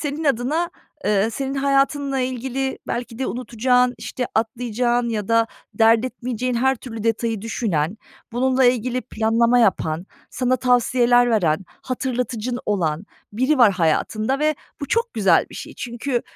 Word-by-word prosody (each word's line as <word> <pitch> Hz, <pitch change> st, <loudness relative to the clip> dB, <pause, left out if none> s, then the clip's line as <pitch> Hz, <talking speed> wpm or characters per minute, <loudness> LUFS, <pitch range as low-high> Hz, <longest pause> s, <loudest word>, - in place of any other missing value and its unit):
senin 300 Hz, +1 st, -3 dB
adına, 290 Hz, +7 st, +1 dB, 0.4 s
ııı, 210 Hz, +1 st, +2 dB
senin 270 Hz, +3 st, -3 dB
hayatınla 275 Hz, 0 st, +1 dB
ilgili 260 Hz, +1 st, -2 dB
belki 235 Hz, -1 st, -4 dB
de 265 Hz, -, -1 dB
unutacağın, 250 Hz, +1 st, +1 dB
işte, 250 Hz, -, -4 dB
atlayacağın 240 Hz, +1 st, 0 dB
ya 210 Hz, -3 st, -3 dB
da 230 Hz, 0 st, +3 dB, 0.3 s
dert 225 Hz, +1 st, +4 dB
etmeyeceğin 250 Hz, 0 st, -3 dB
her 265 Hz, +3 st, +2 dB
türlü 225 Hz, -2 st, -8 dB
detayı 225 Hz, -1 st, 0 dB
düşünen, 205 Hz, -6 st, -1 dB, 0.4 s
bununla 260 Hz, +2 st, +2 dB
ilgili 250 Hz, 0 st, +2 dB
planlama 230 Hz, +2 st, +2 dB
yapan, 180 Hz, -6 st, +1 dB, 0.2 s
sana 255 Hz, 0 st, +1 dB
tavsiyeler 245 Hz, -1 st, +3 dB
veren, 185 Hz, -5 st, +1 dB, 0.2 s
hatırlatıcın 250 Hz, -2 st, -2 dB
olan 175 Hz, -3 st, -1 dB, 0.3 s
biri 260 Hz, +6 st, +1 dB
var 220 Hz, -5 st, +7 dB
hayatında 215 Hz, -, 0 dB
ve 305 Hz, +1 st, +2 dB, 0.3 s
bu 285 Hz, -, -3 dB
çok 465 Hz, +1 st, 0 dB
güzel 195 Hz, -6 st, +3 dB
bir -, -, -11 dB
şey. -, -, -8 dB
Çünkü 240 Hz, +1 st, -3 dB
245 Hz, 140 wpm, -22 LUFS, 225-260 Hz, 0.4 s, var